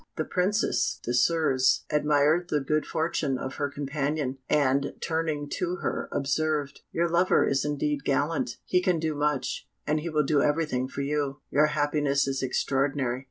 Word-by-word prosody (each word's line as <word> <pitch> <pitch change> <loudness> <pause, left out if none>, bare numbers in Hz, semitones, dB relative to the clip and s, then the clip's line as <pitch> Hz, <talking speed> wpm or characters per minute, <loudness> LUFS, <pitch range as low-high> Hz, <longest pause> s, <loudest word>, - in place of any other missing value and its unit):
The 155 - -2
Princess 195 +4 0
Désirs 130 +1 +3
admired 150 +3 +2
the 150 - +1
good 150 +2 -1
fortune 155 -4 -1
of 130 +1 -6
her 145 - -1
companion, 140 -1 -2
and, 140 -1 +2
turning 160 -3 -2
to 180 0 -1
her, - - -3
observed, 145 0 -1
"Your 170 +1 +1
lover 175 +2 +3
is 135 0 +1
indeed 150 -1 -1
gallant; 145 -3 0
he 180 - +2
can 180 -2 +2
do 160 -1 -1
much, 150 -1 -1 0.2
and 150 +1 +1
he 165 +3 -4
will 155 -1 +2
do 145 0 +3
everything 145 -4 0
for 135 - -5
you; 140 -1 -2
your 150 +2 +4
happiness 145 -2 +1
is 135 -1 -1
extraordinary." 135 -1 0
145 Hz, 160 wpm, -27 LUFS, 140-155 Hz, 0.2 s, your